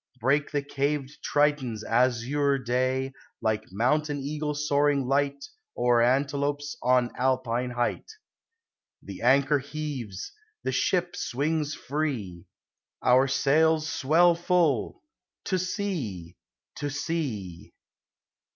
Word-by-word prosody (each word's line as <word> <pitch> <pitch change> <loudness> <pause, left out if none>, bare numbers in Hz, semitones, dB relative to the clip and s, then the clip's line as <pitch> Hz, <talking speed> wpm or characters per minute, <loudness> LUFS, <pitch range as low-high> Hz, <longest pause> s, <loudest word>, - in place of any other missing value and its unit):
Break 140 +5 +2
the 145 -1 -1
caved 140 0 -2
Triton's 145 -7 +1
azure 125 +4 +1
day, 130 +1 -1 0.3
Like 110 -2 -1
mountain 145 +8 +1
eagle 150 +2 -3
soaring 145 -1 +2
lighl 140 +2 +1 0.4
O'er 120 -1 +3
antelopes 140 +3 0
on 125 -1 +3
Alpine 125 -1 0
height. 120 - -2 0.9
THe 100 -2 -9
anchor 140 +4 +4
heaves! 140 -8 -6 0.3
The - - -1
ship 180 -1 0
swings 150 +3 -1
free! 125 - -3 0.6
Our 130 +2 +5
sails 155 +4 +3
swell 165 +6 +4
full! 170 - +1 0.4
To 185 -2 0
sea! 145 - -3 0.4
to 145 - -3
sea! 135 - -4
140 Hz, 100 wpm, -27 LUFS, 125-150 Hz, 0.9 s, Our